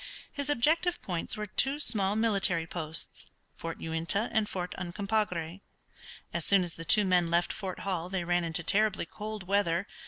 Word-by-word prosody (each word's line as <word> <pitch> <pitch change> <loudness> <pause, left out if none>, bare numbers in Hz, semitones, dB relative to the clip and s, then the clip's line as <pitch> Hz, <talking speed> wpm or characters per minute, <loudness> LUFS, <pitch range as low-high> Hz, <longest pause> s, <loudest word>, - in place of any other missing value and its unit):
His 285 0 -4
objective 320 +7 +2
points 175 +1 -3
were 210 - -2
two 270 +8 0
small 210 -7 +1
military 195 -7 +2
posts, 160 -1 -3 0.3
Fort 165 0 -5
Uintah 165 +7 0
and 220 -2 +1
Fort 180 -1 -3
Uncompahgra. 185 -2 -2 0.7
As 170 - -1
soon 195 +1 +4
as 175 -2 -5
the 165 - -7
two 210 +5 +5
men 180 -2 +3
left 170 +1 +2
Fort 190 -3 -5
Hall 180 -3 -2
they 190 -2 -1
ran 175 0 +1
into 170 +1 -1
terribly 205 +1 +3
cold 210 +3 -6
weather. 190 -2 +2
190 Hz, 165 wpm, -30 LUFS, 170-215 Hz, 0.7 s, two